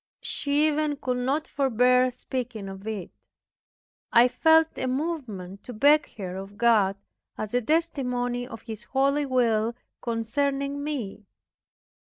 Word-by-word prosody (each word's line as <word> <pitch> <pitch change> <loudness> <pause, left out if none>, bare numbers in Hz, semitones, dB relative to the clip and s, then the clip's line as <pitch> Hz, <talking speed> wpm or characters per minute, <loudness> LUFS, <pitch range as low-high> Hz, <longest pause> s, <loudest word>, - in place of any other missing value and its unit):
She 290 +1 0
even 305 -1 +1
could 250 -2 -2
not 275 +5 0
forbear 250 -1 +3
speaking 245 -4 -5
of 195 +2 -9
it. 210 -5 -4 1.0
I 240 +1 +7
felt 320 +4 +4
a 260 - -2
movement 250 - -4
to 250 - -7
beg 290 +7 +4
her 185 -3 -5
of 195 +1 -8
God, 215 -5 +4 0.4
as 215 0 -5
a 245 - +2
testimony 250 -5 -1
of 225 -4 -10
His 220 -3 -7
holy 275 +3 +1
will 230 -3 +2 0.3
concerning 275 +5 -1
me. 220 -9 -5
250 Hz, 130 wpm, -26 LUFS, 220-285 Hz, 1.0 s, I